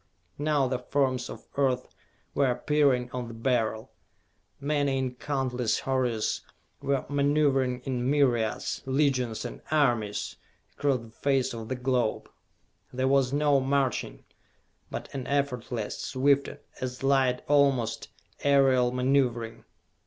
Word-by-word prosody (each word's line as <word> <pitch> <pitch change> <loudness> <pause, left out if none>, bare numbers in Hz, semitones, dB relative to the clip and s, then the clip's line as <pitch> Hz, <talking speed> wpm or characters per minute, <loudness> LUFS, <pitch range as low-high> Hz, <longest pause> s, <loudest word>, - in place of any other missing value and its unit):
Now 145 -2 +2
the 125 -1 -1
forms 130 0 0
of - - -10
Earth 130 -3 +1 0.5
were 140 -2 +2
appearing 130 -2 +2
on 125 -1 -4
the 115 - -8
Beryl. 115 -2 -1 0.7
Men 145 0 0
in 130 -2 -1
countless 125 -3 -1
hordes 125 -5 0 0.4
were 140 -1 0
maneuvering 140 -3 +2
in 125 -1 -2
myriads, 125 -7 +1
legions 130 -5 +1
and 120 - -7
armies, 120 -9 +1 0.4
across 140 -4 +1
the 115 -1 -13
face 135 +1 0
of 115 -1 -7
the 130 - -1
globe. 125 -3 -1 0.6
There 130 +1 0
was 135 -2 +3
no 145 -1 +3
marching, 135 - -1 0.6
but - - -5
an 130 -2 -5
effortless, 125 -6 -2
swift 140 +1 +2 0.3
as 125 0 -4
light 135 -2 +2
almost, 135 -6 +2 0.3
aerial 135 -3 +4
maneuvering. 125 -3 0
130 Hz, 120 wpm, -28 LUFS, 125-140 Hz, 0.7 s, aerial